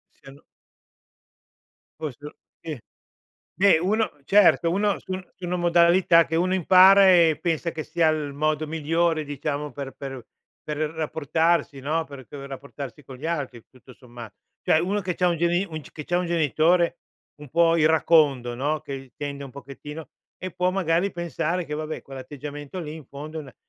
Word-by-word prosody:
Siano 135 +1 -15 1.6
Poi 155 -5 -4
se 145 - -13
u - - -9 0.3
sì. 155 -6 -6 0.8
Beh 195 -3 +5
uno 215 +6 +1
certo, 195 -3 +5
uno 205 +1 +1
su 190 - -8
un 185 0 -4
su 185 - -10
una 180 - -2
modalità 170 0 +4
che 160 - -4
uno 180 +3 +1
impara 190 +2 +7
e 170 -4 +5
pensa 170 -1 -1
che 155 -1 -6
sia 160 0 +2
il 150 -2 -1
modo 155 +1 -1
migliore, 160 +1 0
diciamo, 145 0 -4
per 135 0 -7
per 135 -4 -8 0.4
per 150 -1 -4
rapportarsi, 160 0 0
no, 155 +5 -1
per 140 -2 -11
per 140 -1 -9
rapportarsi 140 0 -8
con 130 - -10
gli 145 - -13
altri 140 -8 -3
tutto 130 0 -17
sommat 120 -4 -12 0.3
cioè 155 - +4
uno 200 +4 -1
che 180 -1 -2
c'ha 180 +1 +2
un 170 - 0
geni 175 +3 +1
un 155 0 -5
cioè - - -16
che 150 - -7
c'ha 175 - 0
un 180 - -1
genitore 170 +2 +2 0.4
un 150 -2 -12
po' 165 +3 +3
iracondo, 150 -6 +3
no, 150 +3 -1
che 135 -3 -8
tende 140 -1 -5
un 135 - -10
pochettino 145 +3 -9 0.3
e 185 - -6
può 180 +2 0
magari 180 0 +1
pensare 175 0 -2
che 150 - -5
vabbè 155 +1 -5
quell'atteggiamento 145 +4 -8
lì 155 -1 -6
in 155 -3 -10
fondo 155 +3 -8
è - - -3
una 135 -4 -14
155 Hz, 175 wpm, -24 LUFS, 140-175 Hz, 1.6 s, impara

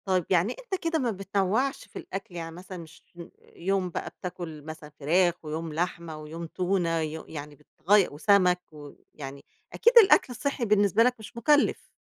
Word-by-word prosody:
طيب 185 -3 +1
يعني 185 +6 +2
أنت 405 -7 -4
كده 330 -1 +1
ما 245 -4 0
بتنوَّعش 200 +7 -1
في - - -9
الأكل، 195 -2 -7
يعني 165 -1 -6
مثلًا 185 +1 -9
مش 165 -2 -12
م 170 - -8 0.3
يوم 190 +1 0
بقى - - -4
بتاكل 175 -4 -7
مثلًا 155 0 -9
فراخ، 175 +4 +3
ويوم 160 +1 -4
لحمة 170 -1 -3
ويوم 155 +2 -7
تونة 175 -1 0
وي 160 0 -4
يعني 150 -1 -8
بتغي 190 +7 +2
وسَمَك، 180 +3 +3
ويعني 145 -2 -11 0.3
أكيد 475 +1 +4
الأكل 385 - +7
الصحّي 280 0 -2
بالنسبة 205 0 +4
لك 250 +1 +2
مش 220 +2 -11
مُكلّف. 290 +5 +2
180 Hz, 165 wpm, -27 LUFS, 160-210 Hz, 0.3 s, الأكل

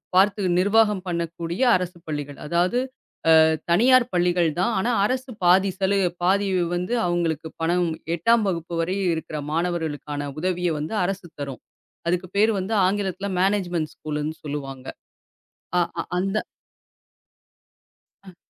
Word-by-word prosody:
பார்த்து 200 +2 +4 0.2
நிர்வாகம் 205 0 +3
பண்ணக்கூடிய 170 +2 -3
அரசுப் 180 -1 -4
பள்ளிகள். 145 -2 -5
அதாவது 175 +8 +1 0.6
அ - - +8 0.3
தனியார் 250 +7 +5
பள்ளிகள் 175 -1 +2
தான். 195 +6 +1
ஆனா 235 +6 +1
அரசு 255 +3 -2
பாதி 190 +2 +5
செலவு 195 -1 +2
பாதி 195 +2 +2 0.3
வந்து 180 +6 -2
அவுங்களுக்கு 165 -3 -1
பணம், 175 +1 +1 0.3
8ஆம் 225 +6 +3
வகுப்பு 170 -1 -4
வரை 185 +4 -1 0.2
இருக்குற 155 -1 -5
மாணவர்களுக்கான 155 -4 -2
உதவிய 180 0 0
வந்து 155 +8 -4
அரசு 195 -1 -4
தரும். 135 -3 -6 0.5
அதுக்கு 180 +1 0
பேரு 215 +2 +5
வந்து 190 +4 -3
ஆங்கிலத்துல 195 0 -1
மேனேஜ்மெண்ட் 180 -5 0
ஸ்கூலுன்னு 150 +1 -4
சொல்லுவாங்க. 135 -3 -6 0.9
ஆ - - +5 0.2
அ - - 0 0.2
அந்த 195 +3 -1 1.9
அ. 190 -2 -14
180 Hz, 125 wpm, -24 LUFS, 165-195 Hz, 1.9 s, அ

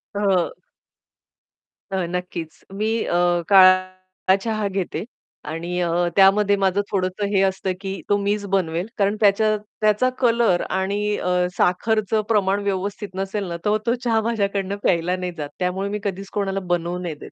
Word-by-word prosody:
हं. 195 -4 +1 1.4
अ, 190 -2 -1
नक्कीच 180 -3 -5
मी 215 +2 -1 0.2
अ, - - -2 0.4
काळा 185 0 +4
चहा 215 -2 -1
घेते. 185 -3 -2 0.5
आणि 170 +3 -3
अ, 170 - 0 0.3
त्यामध्ये 200 +1 +5
माझं 195 0 +1
थोडंसं 190 +1 -1
हे 190 - +4
असतं 190 0 0
की 195 -3 -5
तो 205 - +4
मीच 205 0 -1
बनवेल, 185 -1 -1
कारण 200 +1 +2
त्याच्या 215 +1 +3 0.3
त्याचा 215 +4 +3
कलर 230 -7 +3
आणि 205 +2 -1
अ, 180 - -1 0.3
साखरचं 215 +3 +1
प्रमाण 200 -2 +2
व्यवस्थित 200 +1 -3
नसेल 195 +2 -2
ना, 170 0 -4
तर 210 +1 +3
तो 235 +1 +2
चहा 225 -2 +2
माझ्याकडून 200 -3 -1
प्यायला 175 +1 +2
नाही 180 -1 -4
जात 145 -1 -4
त्यामुळे 190 +2 -1
मी 210 +1 -3
कधीच 195 0 -4
कोणाला 195 -1 -1
बनवू 175 +1 -1
नाही 170 -4 -4
देत, - - -11
195 Hz, 155 wpm, -22 LUFS, 185-205 Hz, 1.4 s, त्यामध्ये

